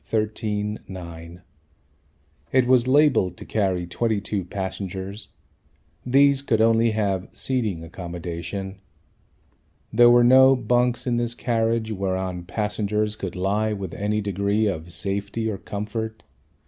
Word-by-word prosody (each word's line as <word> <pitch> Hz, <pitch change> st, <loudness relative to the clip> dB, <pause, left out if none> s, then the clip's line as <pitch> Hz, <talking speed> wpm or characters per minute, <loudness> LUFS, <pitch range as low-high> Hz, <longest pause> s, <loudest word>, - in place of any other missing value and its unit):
13 105 Hz, -1 st, -2 dB
9. 85 Hz, -2 st, -9 dB, 1.1 s
It 130 Hz, -1 st, +4 dB
was 125 Hz, -1 st, +4 dB
labelled 130 Hz, -, +3 dB
to -, -, -10 dB
carry 95 Hz, -5 st, 0 dB
22 105 Hz, +1 st, -1 dB
passengers. 95 Hz, +2 st, -5 dB, 0.7 s
These 140 Hz, +2 st, +4 dB
could 115 Hz, -5 st, +1 dB
only 115 Hz, +1 st, +4 dB
have 100 Hz, -3 st, -1 dB
seating 110 Hz, -11 st, -2 dB
accommodation. 85 Hz, +3 st, -6 dB, 1.1 s
There 120 Hz, +2 st, +7 dB
were 120 Hz, 0 st, +6 dB
no 130 Hz, +2 st, +7 dB
bunks 120 Hz, 0 st, +1 dB
in 120 Hz, -2 st, 0 dB
this 120 Hz, 0 st, -1 dB
carriage 115 Hz, -2 st, 0 dB
whereon 95 Hz, -3 st, -2 dB
passengers 105 Hz, +2 st, -1 dB
could 95 Hz, -4 st, -6 dB
lie 105 Hz, +4 st, 0 dB
with 95 Hz, -4 st, -5 dB
any 105 Hz, +3 st, -1 dB
degree 100 Hz, +2 st, 0 dB
of 85 Hz, -4 st, -3 dB
safety 100 Hz, +5 st, -3 dB
or 100 Hz, -3 st, -3 dB
comfort. 110 Hz, +2 st, -5 dB
105 Hz, 120 wpm, -24 LUFS, 95-115 Hz, 1.1 s, There